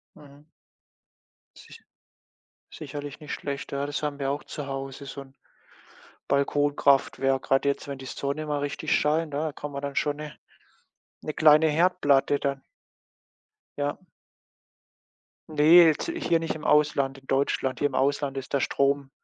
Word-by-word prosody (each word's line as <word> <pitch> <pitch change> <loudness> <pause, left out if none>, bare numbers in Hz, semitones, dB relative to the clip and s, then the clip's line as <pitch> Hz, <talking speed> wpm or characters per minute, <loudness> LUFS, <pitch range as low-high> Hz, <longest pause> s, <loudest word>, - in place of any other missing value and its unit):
Mhm. 145 0 -17 1.1
Sich - - -15 0.9
sicherlich 145 -1 -7
nicht 150 -1 -8
schlecht, 140 -1 -6
ja. 140 0 -1
Das 145 +1 -4
haben 145 -1 -3
wir 135 0 -1
auch 145 - -3
zu 145 -2 -7
Hause, 135 +1 -6
so 140 +1 -7
'n 135 0 -18 1.0
Balkonkraftwerk. 140 -1 +2
Grade 135 +1 +1
jetzt, 140 - -3
wenn 140 - -5
die 130 - -10
Sonne 140 +4 -4
mal 145 -1 -2
richtig 145 0 -1
scheint, 150 0 0
ne, 145 - -1
da 155 0 -2
kann 150 0 -7
man 140 - -5
dann 140 -1 -5
schon 145 -1 +1
'ne 150 -1 -9 0.8
'ne 155 - -5
kleine 155 0 +5
Herdplatte 150 -4 +2
dann 140 -1 -2 1.2
Ja. 145 0 -2 1.5
Ne, 160 +3 +7
jetzt 155 - +1
hier 335 - 0
nicht 165 -1 -3
im 155 - -9
Ausland, 140 -2 +2
in 135 - -19
Deutschland. 135 -1 0
Hier 145 - +2
im 130 - -12
Ausland 140 +1 0
ist 130 - -8
der 140 - +1
Strom 140 +1 0
145 Hz, 155 wpm, -26 LUFS, 140-150 Hz, 1.5 s, Ne